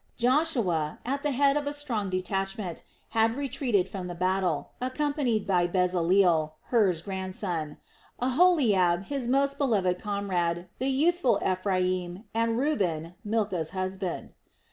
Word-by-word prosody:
Joshua, 240 - +1
at 275 +3 -1
the 295 - 0
head 280 +1 +3
of 295 -1 -1
a 290 - -1
strong 235 -9 -2
detachment, 190 0 -3 0.3
had 225 +2 +2
retreated 255 -8 0
from 190 -2 -6
the 175 - -6
battle, 185 +1 0
accompanied 255 -4 0
by 180 -3 +2
Bezaleel, 180 -3 +2 0.2
Hur's 190 -9 +3
grandson, 185 -5 -3 0.4
Aholiab, 245 - +3
his 275 -1 -3
most 275 +2 +2
beloved 195 -10 +1
comrade, 180 -4 -1
the 260 +2 0
youthful 305 +1 +2
Ephraim, 185 0 -1
and 230 0 +1
Reuben, 180 - -1
Milcah's 205 -7 -1
husband. 185 -1 -3
200 Hz, 120 wpm, -27 LUFS, 180-260 Hz, 0.4 s, head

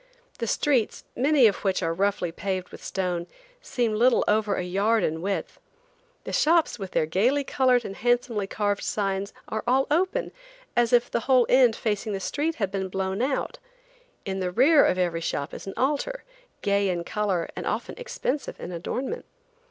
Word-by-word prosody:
The 230 - -2
streets, 255 -2 +1
many 275 +1 +4
of 210 - +4
which 190 -2 -1
are 165 - 0
roughly 195 -1 0
paved 185 +1 -3
with - - -12
stone, 180 -2 -2 0.3
seem 240 - -1
little 235 +3 +4
over 210 -1 +2
a - - -2
yard 200 +5 +1
in 160 +1 -1
width. 195 +2 -3 0.6
The - - -6
shops, 325 -5 +3
with 195 -2 -5
their 155 - +1
gayly 235 - +2
colored 255 -3 +2
and 195 - -6
handsomely 240 -4 0
carved 205 0 -1
signs, 195 -1 -2 0.2
are 220 0 -3
all 265 +2 +3
open, 375 +10 +1 0.4
as 240 -1 +3
if 245 0 +3
the - - +1
whole 255 -2 +6
end 250 -3 +5
facing 215 -1 -2
the 195 - -2
street 300 - -1
had 200 -3 -2
been 190 -1 -2
blown 190 +2 -2
out. 265 +1 -1 0.7
In 195 -1 -3
the 185 -1 -1
rear 280 - +5
of 185 - +2
every 175 -2 0
shop 145 -2 -3
is - - -8
an 195 - -6
altar, 300 - -1 0.4
gay 200 -1 +2
in 175 -2 -1
color 190 -3 -1
and - - -5
often - - -2
expensive 300 - -3
in - - -6
adornment. 250 - -4
210 Hz, 180 wpm, -26 LUFS, 190-255 Hz, 0.7 s, whole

